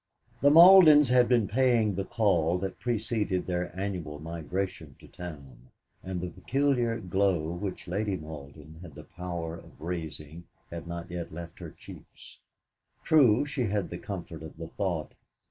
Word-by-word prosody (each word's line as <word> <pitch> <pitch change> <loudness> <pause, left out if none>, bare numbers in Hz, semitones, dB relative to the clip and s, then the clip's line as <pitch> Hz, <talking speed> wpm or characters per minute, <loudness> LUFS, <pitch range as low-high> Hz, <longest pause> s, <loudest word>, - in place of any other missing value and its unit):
The 145 - +6
Maldens 160 -3 +8
had 125 -1 +5
been 120 -5 +3
paying 120 -3 +2
the 95 +1 -2
call 90 -7 +1
that 95 0 -5
preceded 110 -5 -1
their 90 -1 -2
annual 90 -7 -4
migration 80 -1 -5
to - - -16
town, 70 -8 -11 0.3
and 95 -1 -4
the 90 0 -4
peculiar 120 +3 0
glow 95 -4 0
which 90 +2 -5
Lady 100 +2 -1
Malden 75 0 -11
had 85 -6 -11
the - - -10
power 85 -2 -6
of - - -16
raising 80 -1 -6 0.3
had 85 0 -7
not 85 +1 -6
yet 85 -1 -5
left 85 +1 -9
her - - -7
cheeks. - - -14 0.6
True, 135 -5 +4
she 140 -4 -2
had 100 -3 -2
the 85 - -5
comfort 85 -5 -7
of 80 -1 -10
the 80 0 -7
thought 85 -5 -3
90 Hz, 155 wpm, -28 LUFS, 80-110 Hz, 0.6 s, Maldens